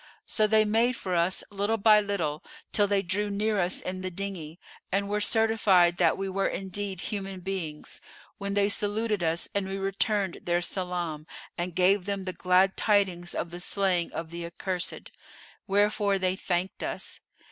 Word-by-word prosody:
So 215 Hz, -1 st, +2 dB
they 215 Hz, 0 st, +4 dB
made 230 Hz, +4 st, +2 dB
for 185 Hz, -4 st, -4 dB
us, 175 Hz, +2 st, +1 dB
little 205 Hz, +3 st, 0 dB
by 215 Hz, 0 st, +6 dB
little, 170 Hz, -8 st, -2 dB, 0.3 s
till 205 Hz, -1 st, +3 dB
they 200 Hz, -1 st, +1 dB
drew 205 Hz, +4 st, -1 dB
near 210 Hz, +1 st, 0 dB
us 180 Hz, 0 st, +2 dB
in 185 Hz, 0 st, -4 dB
the 185 Hz, -, -3 dB
dinghy[FN#444] 180 Hz, -4 st, -6 dB, 0.3 s
and 200 Hz, +1 st, +1 dB
were 210 Hz, +1 st, -1 dB
certified 205 Hz, -6 st, +4 dB
that -, -, +3 dB
we 195 Hz, 0 st, -2 dB
were 195 Hz, +1 st, 0 dB
indeed 195 Hz, +1 st, -4 dB
human 195 Hz, -3 st, -5 dB
beings, 175 Hz, -5 st, -5 dB, 0.4 s
when 200 Hz, 0 st, -3 dB
they 200 Hz, 0 st, +4 dB
saluted 210 Hz, 0 st, 0 dB
us 165 Hz, 0 st, 0 dB
and 200 Hz, -1 st, -1 dB
we 195 Hz, 0 st, -3 dB
returned 195 Hz, 0 st, 0 dB
their 175 Hz, 0 st, 0 dB
salam 175 Hz, -4 st, -3 dB, 0.3 s
and 175 Hz, -1 st, -4 dB
gave 185 Hz, +1 st, +3 dB
them 200 Hz, -1 st, -3 dB
the 185 Hz, -, -3 dB
glad 185 Hz, +2 st, +3 dB
tidings 190 Hz, -5 st, +1 dB
of 170 Hz, -, -3 dB
the 175 Hz, -, -7 dB
slaying 185 Hz, -2 st, +1 dB
of 165 Hz, 0 st, -6 dB
the 170 Hz, 0 st, -5 dB
accursed, 180 Hz, +2 st, -4 dB, 0.6 s
wherefore 205 Hz, 0 st, +2 dB
they 185 Hz, -1 st, 0 dB
thanked 185 Hz, 0 st, -2 dB
us. -, -, -5 dB
195 Hz, 170 wpm, -28 LUFS, 180-205 Hz, 0.6 s, by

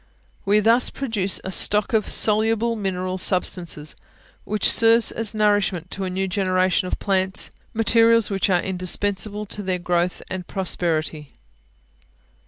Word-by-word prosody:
We 205 Hz, +2 st, +3 dB
thus 230 Hz, +4 st, +3 dB
produce 215 Hz, -8 st, -1 dB
a 190 Hz, -, -5 dB
stock 210 Hz, +4 st, +3 dB
of 220 Hz, -2 st, +1 dB
soluble 225 Hz, +2 st, +2 dB
mineral 185 Hz, -3 st, -3 dB
substances, 175 Hz, -4 st, -2 dB, 0.5 s
which 210 Hz, -1 st, 0 dB
serves 230 Hz, 0 st, +4 dB
as 225 Hz, -1 st, -4 dB
nourishment 205 Hz, -5 st, 0 dB
to 195 Hz, -, -4 dB
a -, -, -3 dB
new 190 Hz, +1 st, -2 dB
generation 185 Hz, -1 st, 0 dB
of -, -, -3 dB
plants, 190 Hz, -1 st, -1 dB, 0.2 s
materials 230 Hz, 0 st, +3 dB
which 195 Hz, 0 st, 0 dB
are 180 Hz, -2 st, +2 dB
indispensable 195 Hz, +2 st, -3 dB
to 205 Hz, -, -6 dB
their 185 Hz, -2 st, -2 dB
growth 175 Hz, 0 st, -1 dB
and 185 Hz, -2 st, -6 dB
prosperity. 160 Hz, -5 st, -3 dB
195 Hz, 135 wpm, -22 LUFS, 185-215 Hz, 0.5 s, serves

